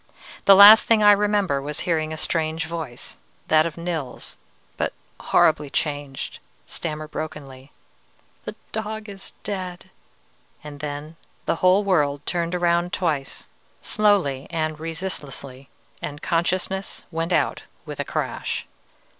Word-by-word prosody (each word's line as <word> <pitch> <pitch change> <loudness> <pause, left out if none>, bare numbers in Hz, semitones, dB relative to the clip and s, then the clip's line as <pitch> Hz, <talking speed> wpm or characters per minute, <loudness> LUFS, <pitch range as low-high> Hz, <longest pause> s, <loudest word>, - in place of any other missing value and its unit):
The 195 - +9
last 205 +3 +10
thing 220 -2 +4
I 205 - +9
remember 205 -8 +2
was 145 +1 -3
hearing 160 -3 0
a 155 - -4
strange 160 -1 -1
voice, 160 -7 -6 0.3
that 155 +1 +5
of 165 - -8
Nils, 165 -7 -4 0.4
but - - -1 0.3
horribly 150 -2 +3
changed, 145 -2 -3 0.3
stammer 155 -2 -5
brokenly, 145 -3 -7 0.7
'The - - -6 0.2
dog 220 0 -4
is 195 -1 -10
dead!' 185 -3 -5 0.7
and 145 -1 -9
then 150 +2 -6 0.3
the - - 0
whole 185 +4 +4
world 145 -7 +1
turned 170 0 -1
around 175 0 +1
twice, 155 -7 -2 0.4
slowly 190 -11 +2
and 155 -1 -2
resistlessly, 145 -6 -5 0.3
and 145 0 -6
consciousness 185 +3 -1
went 165 +1 -2
out - - +1 0.2
with - - -7
a - - +1
crash. - - -3
165 Hz, 125 wpm, -23 LUFS, 150-185 Hz, 0.7 s, last